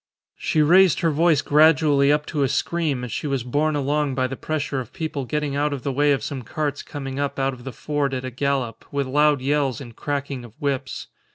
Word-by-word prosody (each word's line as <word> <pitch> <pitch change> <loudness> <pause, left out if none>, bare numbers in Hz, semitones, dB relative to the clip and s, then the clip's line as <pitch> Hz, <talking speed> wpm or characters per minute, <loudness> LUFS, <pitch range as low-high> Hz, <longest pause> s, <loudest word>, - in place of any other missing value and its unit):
She 155 - +2
raised 180 +2 +5
her 165 - +2
voice 155 -1 +3
gradually 150 -2 +4
up 150 0 +1
to 150 - -2
a 135 - +3
scream 150 -3 -1
as 125 - -5
she 150 - -3
was 135 -4 -1
borne 150 +5 0
along 145 0 0
by 130 0 +1
the 130 +1 -3
pressure 145 -1 -2
of 125 -2 -7
people 155 -6 -4
getting 150 +1 -2
out 145 +1 +1
of 135 -4 -5
the 140 - -1
way 145 +2 +3
of 135 -6 +1
some 135 +1 -4
carts 145 +3 -3
coming 135 -1 -6
up 145 -1 -2
out 135 0 0
of 120 0 -12
the 135 - -4
ford 140 +2 -2
at 130 0 -4
a 130 - -4
gallop, 130 -3 -2
with 140 -1 -1
loud 145 +1 +3
yells 140 -1 0
and 120 -5 -10
cracking 140 -2 -3
of 120 +3 -14
whips. 140 -3 -2
140 Hz, 225 wpm, -23 LUFS, 130-150 Hz, -, raised